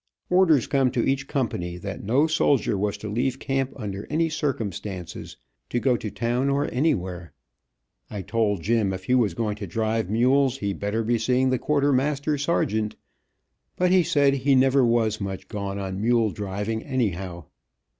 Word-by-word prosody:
Orders 170 Hz, -8 st, +4 dB
come 135 Hz, -2 st, +2 dB
to 120 Hz, -, +1 dB
each 135 Hz, 0 st, 0 dB
company, 90 Hz, -, -2 dB
that 100 Hz, +2 st, -6 dB
no 125 Hz, +9 st, +3 dB
soldier 145 Hz, -8 st, +2 dB
was 100 Hz, +1 st, -1 dB
to 110 Hz, -, -7 dB
leave 125 Hz, +5 st, -1 dB
camp 135 Hz, -1 st, -1 dB
under 100 Hz, -5 st, -6 dB
any 165 Hz, +2 st, +1 dB
circumstances, 100 Hz, -, -4 dB, 0.3 s
to 120 Hz, -, 0 dB
go 125 Hz, 0 st, +2 dB
to 110 Hz, -, -4 dB
town 120 Hz, +5 st, -1 dB
or 140 Hz, +1 st, +1 dB
anywhere. 95 Hz, -, -1 dB, 0.8 s
I 100 Hz, -2 st, -5 dB
told 105 Hz, -2 st, 0 dB
Jim 110 Hz, -3 st, +1 dB
if 95 Hz, 0 st, -6 dB
he 125 Hz, -, 0 dB
was 110 Hz, -9 st, +2 dB
going 105 Hz, -1 st, -2 dB
to 100 Hz, -, -6 dB
drive 110 Hz, +1 st, -1 dB
mules, 130 Hz, +4 st, +3 dB
he 100 Hz, -5 st, -2 dB
better 105 Hz, +3 st, -2 dB
be 115 Hz, +1 st, +1 dB
seeing 130 Hz, +3 st, +2 dB
the 130 Hz, -, +1 dB
quartermaster 145 Hz, 0 st, +1 dB
sergeant, 110 Hz, -8 st, 0 dB, 0.8 s
but 180 Hz, 0 st, +2 dB
he 185 Hz, -1 st, +6 dB
said 145 Hz, -5 st, +3 dB
he 135 Hz, 0 st, +2 dB
never 135 Hz, +1 st, +4 dB
was 115 Hz, -3 st, +1 dB
much 95 Hz, -1 st, -5 dB
gone 100 Hz, -1 st, -4 dB
on 95 Hz, 0 st, -4 dB
mule 115 Hz, -1 st, +2 dB
driving, 105 Hz, +3 st, -3 dB
anyhow. 95 Hz, -, -2 dB
115 Hz, 165 wpm, -25 LUFS, 100-135 Hz, 0.8 s, he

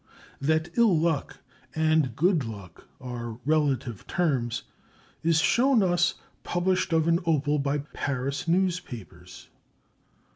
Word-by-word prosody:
That 160 Hz, +3 st, +1 dB
ill 220 Hz, -8 st, +5 dB
luck 160 Hz, -3 st, -1 dB, 0.4 s
and 155 Hz, -6 st, +2 dB
good 170 Hz, 0 st, +2 dB
luck 100 Hz, -7 st, -9 dB
are 120 Hz, -3 st, -6 dB
relative 140 Hz, -7 st, 0 dB
terms 135 Hz, -10 st, 0 dB, 0.6 s
is 165 Hz, -1 st, +3 dB
shown 245 Hz, +6 st, +3 dB
us 175 Hz, -1 st, +2 dB, 0.3 s
published 180 Hz, +1 st, 0 dB
of 160 Hz, -1 st, +2 dB
an 170 Hz, 0 st, +3 dB
opal 150 Hz, -2 st, +2 dB
by 140 Hz, +1 st, -1 dB
Paris 140 Hz, +2 st, -3 dB
newspapers. 170 Hz, -, -3 dB
155 Hz, 110 wpm, -27 LUFS, 130-175 Hz, 0.6 s, ill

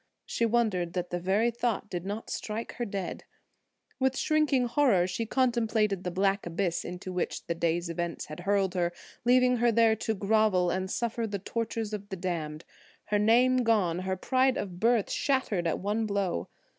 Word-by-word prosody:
She 230 Hz, -, 0 dB
wondered 210 Hz, -7 st, +1 dB
that 180 Hz, -1 st, -3 dB
the 175 Hz, -, -1 dB
very 200 Hz, +6 st, +2 dB
thought 235 Hz, -2 st, -1 dB
did 180 Hz, -1 st, -5 dB
not 210 Hz, +3 st, -5 dB
strike 220 Hz, +2 st, -4 dB
her 240 Hz, -, -1 dB
dead. 195 Hz, -4 st, -4 dB, 0.8 s
With 265 Hz, 0 st, +1 dB
shrinking 300 Hz, -5 st, +2 dB
horror 240 Hz, -8 st, +3 dB
she 185 Hz, +5 st, -3 dB
contemplated 225 Hz, -6 st, +1 dB
the 180 Hz, -, -2 dB
black 195 Hz, +1 st, 0 dB
abyss 175 Hz, 0 st, -1 dB
into 180 Hz, +1 st, -6 dB
which 180 Hz, -, -3 dB
the 170 Hz, -, -1 dB
day's 170 Hz, +1 st, 0 dB
events 170 Hz, 0 st, -3 dB
had 155 Hz, +2 st, -9 dB
hurled 195 Hz, 0 st, +1 dB
her, 175 Hz, -2 st, 0 dB, 0.3 s
leaving 250 Hz, 0 st, +4 dB
her 240 Hz, 0 st, +3 dB
there 225 Hz, 0 st, +4 dB
to 220 Hz, +1 st, -1 dB
grovel 200 Hz, -3 st, +2 dB
and 190 Hz, 0 st, -2 dB
suffer 230 Hz, +1 st, -1 dB
the 200 Hz, -1 st, -3 dB
tortures 225 Hz, +2 st, -3 dB
of 205 Hz, -1 st, -5 dB
the 190 Hz, -, -4 dB
damned. 165 Hz, -3 st, -4 dB, 0.4 s
Her 210 Hz, 0 st, +2 dB
name 245 Hz, +4 st, +4 dB
gone, 210 Hz, -8 st, +2 dB
her 190 Hz, 0 st, -2 dB
pride 260 Hz, +5 st, +2 dB
of 180 Hz, -3 st, -5 dB
birth 230 Hz, 0 st, +2 dB
shattered 240 Hz, -11 st, 0 dB
at 165 Hz, -, 0 dB
one 210 Hz, +3 st, -1 dB
blow! 195 Hz, -, -1 dB
205 Hz, 180 wpm, -29 LUFS, 180-230 Hz, 0.8 s, leaving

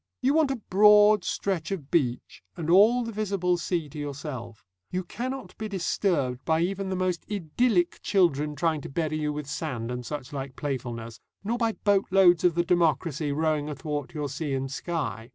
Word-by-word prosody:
You 265 Hz, +2 st, +3 dB
want 315 Hz, -2 st, +3 dB
a 270 Hz, -, 0 dB, 0.2 s
broad 210 Hz, +1 st, +6 dB
stretch 195 Hz, -5 st, -2 dB
of 160 Hz, -8 st, -5 dB
beach 125 Hz, -7 st, -1 dB, 0.2 s
and 165 Hz, -1 st, -1 dB
all 220 Hz, +7 st, +6 dB
the 230 Hz, -, -5 dB
visible 195 Hz, -4 st, 0 dB
sea 170 Hz, -2 st, -2 dB
to 150 Hz, -, -8 dB
yourself. 135 Hz, -7 st, -6 dB, 0.2 s
You 185 Hz, +1 st, -2 dB
cannot 245 Hz, +1 st, -5 dB
be 215 Hz, -, -3 dB
disturbed 170 Hz, -9 st, -1 dB
by 160 Hz, 0 st, +1 dB
even 195 Hz, +2 st, -1 dB
the 190 Hz, -, -1 dB
most 180 Hz, -2 st, -1 dB
idyllic 195 Hz, 0 st, +1 dB
children 150 Hz, -6 st, +2 dB
trying 155 Hz, 0 st, 0 dB
to -, -, -8 dB
bury 155 Hz, +1 st, -2 dB
you 150 Hz, -1 st, -1 dB
with 150 Hz, 0 st, -5 dB
sand 135 Hz, -5 st, -4 dB
and 125 Hz, 0 st, -4 dB
suchlike 135 Hz, -1 st, -6 dB
playfulness, 120 Hz, -5 st, -5 dB, 0.2 s
nor 230 Hz, +4 st, -1 dB
by 230 Hz, -2 st, +1 dB
boatloads 195 Hz, -4 st, +3 dB
of 175 Hz, -2 st, +3 dB
the 170 Hz, 0 st, +1 dB
democracy 165 Hz, -3 st, +1 dB
rowing 155 Hz, 0 st, 0 dB
athwart 145 Hz, +1 st, -4 dB
your 150 Hz, -1 st, -2 dB
sea 145 Hz, 0 st, -3 dB
and 135 Hz, 0 st, -3 dB
sky. 140 Hz, -7 st, -4 dB
165 Hz, 175 wpm, -27 LUFS, 145-195 Hz, 0.2 s, broad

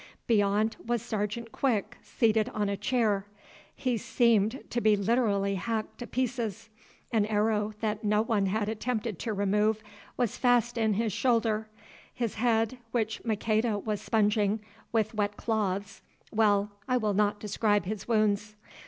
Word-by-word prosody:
Beyond 210 Hz, 0 st, +2 dB
was 235 Hz, -1 st, -1 dB
Sergeant 220 Hz, 0 st, -3 dB
Quick, 235 Hz, -4 st, 0 dB
seated 220 Hz, -2 st, +1 dB
on 205 Hz, -1 st, 0 dB
a 200 Hz, -, 0 dB
chair. 210 Hz, -3 st, 0 dB, 0.5 s
He 255 Hz, -3 st, 0 dB
seemed 225 Hz, +1 st, +2 dB
to 240 Hz, -, 0 dB
be 215 Hz, -1 st, +5 dB
literally 200 Hz, -2 st, +1 dB
hacked 215 Hz, +3 st, -3 dB
to 240 Hz, -, -6 dB
pieces. 235 Hz, -4 st, -2 dB, 0.4 s
An 215 Hz, -3 st, +2 dB
arrow 215 Hz, 0 st, +1 dB
that 215 Hz, -1 st, -1 dB
no 210 Hz, +1 st, +2 dB
one 210 Hz, -4 st, +1 dB
had 205 Hz, +2 st, 0 dB
attempted 220 Hz, -2 st, -2 dB
to 230 Hz, -, -2 dB
remove 210 Hz, +2 st, +1 dB, 0.3 s
was 245 Hz, -4 st, 0 dB
fast 245 Hz, -1 st, +3 dB
in 220 Hz, -3 st, +1 dB
his 220 Hz, -1 st, 0 dB
shoulder; 225 Hz, -3 st, +1 dB, 0.4 s
his 235 Hz, -4 st, -2 dB
head, 225 Hz, +1 st, +1 dB
which 225 Hz, -2 st, -2 dB
Maqueda 220 Hz, 0 st, +1 dB
was 210 Hz, 0 st, -3 dB
sponging 210 Hz, -1 st, +2 dB, 0.3 s
with 225 Hz, 0 st, +1 dB
wet 205 Hz, -1 st, -1 dB
cloths—well, 205 Hz, 0 st, -1 dB, 0.2 s
I 255 Hz, -1 st, +2 dB
will 215 Hz, -4 st, 0 dB
not 205 Hz, +1 st, +1 dB
describe 205 Hz, -1 st, +1 dB
his 210 Hz, +1 st, -5 dB
wounds. 210 Hz, -2 st, +1 dB
215 Hz, 145 wpm, -29 LUFS, 205-230 Hz, 0.5 s, be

